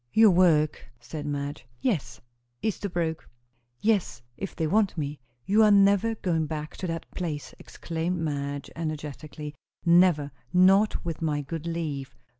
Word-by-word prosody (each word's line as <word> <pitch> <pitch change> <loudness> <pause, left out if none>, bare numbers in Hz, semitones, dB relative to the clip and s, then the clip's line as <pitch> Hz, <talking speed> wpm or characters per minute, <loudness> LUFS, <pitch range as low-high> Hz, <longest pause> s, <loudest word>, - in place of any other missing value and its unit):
"Your 220 -2 +7
work!" 160 -4 +3
said 145 +5 -6
Madge. 145 -2 -4
"Yes." 200 - -1 0.4
"Esterbrooke!" 175 -6 -2 0.5
"Yes, 205 - +1
if 195 +7 -6
they 160 - -1
want 200 +2 +2
me." 145 -1 -3 0.3
"You 210 +3 +4
are 215 - +7
never 200 +2 +5
going 165 -7 0
back 150 0 -5
to 185 - -3
that 165 -1 -3
place!" 160 -5 -4
exclaimed 170 +2 -3
Madge 145 -3 -3
energetically. 150 -1 -5 0.3
"Never! 170 -4 +5 0.2
not 190 +3 +4
with 165 -2 -4
my 150 -2 0
good 165 +3 -5
leave. 145 -6 -3
165 Hz, 135 wpm, -27 LUFS, 150-185 Hz, 0.5 s, Your